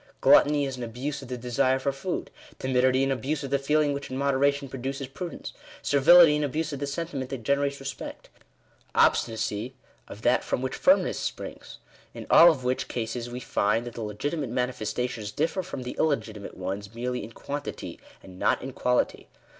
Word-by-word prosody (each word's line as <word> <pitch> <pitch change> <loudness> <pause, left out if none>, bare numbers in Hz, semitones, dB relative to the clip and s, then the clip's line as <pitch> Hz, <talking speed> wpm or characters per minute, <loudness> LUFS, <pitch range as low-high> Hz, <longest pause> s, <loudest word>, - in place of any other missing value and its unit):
Gluttony 145 -1 +5
is 135 -1 -4
an 125 - -5
abuse 130 +5 -4
of 135 - -10
the 125 0 -4
desire 125 +2 +1
for 140 +1 -1
food; 135 +7 -4 0.3
timidity, 130 0 +2
an 135 - +1
abuse 140 +3 -2
of 135 - -5
the 140 - +2
feeling 150 +1 +2
which 140 0 -5
in 130 - -4
moderation 140 +1 +1
produces 135 +2 -4
prudence; 170 +6 -7 0.3
servility, 150 +3 +7
an 150 - 0
abuse 150 +2 -2
of 140 - -4
the 140 - -2
sentiment 140 -3 -4
that 135 -4 -5
generates 140 +2 0
respect; 135 0 -7 0.7
obstinacy, 115 +2 +1 0.3
of 105 - -11
that 120 - +3
from 125 - -2
which 130 - -2
firmness 280 +1 +3
springs: - - -6 0.4
in - - -7
all 170 - +9
of 145 -6 0
which 125 +1 -1
cases 120 0 -4
we 120 +1 -5
find 115 -1 0
that 120 - -7
the 115 - -6
legitimate 135 +7 -3
mani 125 +1 -1
festations 110 -1 -4
differ 165 +5 0
from 150 -7 -6
the 125 - -6
illegitimate 110 -9 -1
ones, 100 +3 -5
merely 125 +1 -3
in 110 - -9
quantity, 145 +4 -6 0.2
and 95 -1 -13
not - - +2
in 130 0 -6
quality. 125 0 0
130 Hz, 185 wpm, -27 LUFS, 120-140 Hz, 0.7 s, all